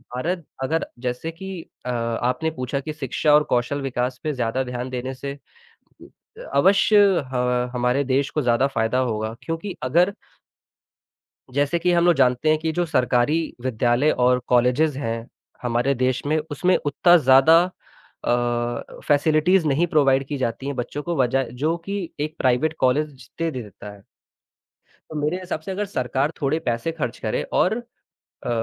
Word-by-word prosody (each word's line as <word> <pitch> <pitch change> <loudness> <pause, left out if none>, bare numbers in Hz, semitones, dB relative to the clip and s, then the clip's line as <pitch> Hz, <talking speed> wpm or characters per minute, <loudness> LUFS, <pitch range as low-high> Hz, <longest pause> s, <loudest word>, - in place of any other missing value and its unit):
भारत 170 +5 -2 0.2
अगर 160 +5 -1
जैसे 125 +6 -3
कि 190 +1 -7 0.2
अ, - - -3
आपने 125 +5 -1
पूछा 130 -1 -3
कि 155 +3 -5
शिक्षा 150 +1 0
और 150 - +5
कौशल 125 +4 0
विकास 125 -1 -2
पे 155 - -1
ज़्यादा 125 0 -1
ध्यान 125 0 -5
देने 130 +1 -4
से 140 +1 -6
कु 465 - -22 0.3
अ, - - -9 0.2
अवश्य 200 +2 +5 0.3
ह 125 0 0
हमारे 125 +3 +1
देश 135 +1 0
को 150 - -1
ज़्यादा 125 +1 +2
फ़ायदा 125 -2 0
होगा 110 -3 -1
क्योंकि 165 +4 -4
अगर 175 +9 +3 1.4
जैसे 145 +4 +1
कि 180 +1 +2
हम 170 0 +3
लोग 175 - +6
जानते 125 +2 +2
हैं 155 - +4
कि 160 0 -1
जो 175 +2 0
सरकारी 125 -1 +2 0.3
विद्यालय 125 +3 +2
और 125 0 +3
कॉलेजेस 125 +5 +3
हैं 115 -3 -3 0.3
हमारे 125 +2 +1
देश 130 0 0
में, 155 +2 +1
उसमें 180 +6 +2
उत्ता 175 +5 +4
ज़्यादा 135 +3 +6 0.6
अ, 120 0 -1
फ़ैसिलिटीज़ 155 +4 +3
नहीं 150 +5 +2
प्रोवाइड 140 -4 +3
की 145 - -3
जाती 130 +1 -3
हैं 140 - -3
बच्चों 125 +4 -4
को 170 +1 -2
वजा 135 +1 +2 0.2
जो 160 +2 +2
कि 195 -3 -3
एक 155 +2 -3
प्राइवेट 130 +5 +2
कॉलेज 145 +4 +1
जितने 160 +6 -5
दे 130 - -5
देता 105 0 -11
है। 100 - -19 1.1
तो 155 - -8
मेरे 150 +5 0
हिसाब 180 -3 -4
से 190 - -6
अगर 205 +2 -2
सरकार 135 - -1
थोड़े 150 +3 +1
पैसे 120 +7 -1
खर्च 145 -7 -4
करे 110 - -1
और 185 - +3 0.7
अ, - - -2
135 Hz, 165 wpm, -23 LUFS, 125-160 Hz, 1.4 s, लोग